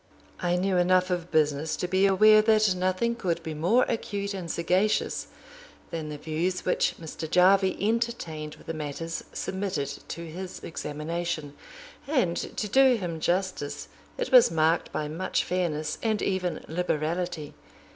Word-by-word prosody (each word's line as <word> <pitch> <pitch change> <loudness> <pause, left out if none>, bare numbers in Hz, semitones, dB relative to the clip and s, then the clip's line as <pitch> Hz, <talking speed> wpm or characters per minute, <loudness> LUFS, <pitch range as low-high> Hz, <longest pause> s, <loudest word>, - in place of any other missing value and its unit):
I 175 0 +1
knew 185 +1 +1
enough 185 +1 +3
of 175 -1 -2
business 155 0 +1
to 180 - -3
be 190 +2 +3
aware 215 +3 +6
that 215 -2 +4
nothing 185 +5 0
could 180 -7 -2
be 160 - -4
more 180 +12 +3
acute 205 -3 -3
and 180 -4 -5
sagacious 180 +6 +1 0.6
than 160 -2 -4
the 150 - -5
views 165 +5 -2
which 180 - +1
Mr. 160 -1 -6
Jarvie 190 +2 +4
entertained 205 -9 -2
of - - -18
the 165 - -4
matters 155 +2 -4
submitted 190 -7 -3 0.2
to 170 - -6
his 180 +3 -7
examination; 160 0 -4 0.5
and, 250 - +1
to 210 - -3
do 265 +4 +5
him 175 -7 -4
justice, 175 -4 -2 0.3
it - - -3
was 250 -2 +8
marked 160 +1 +1
by 150 - -2
much 165 +5 -1
fairness, 155 -4 -2
and 220 -2 0
even 185 -2 -1
liberality. 165 -1 -2
180 Hz, 145 wpm, -27 LUFS, 160-195 Hz, 0.6 s, was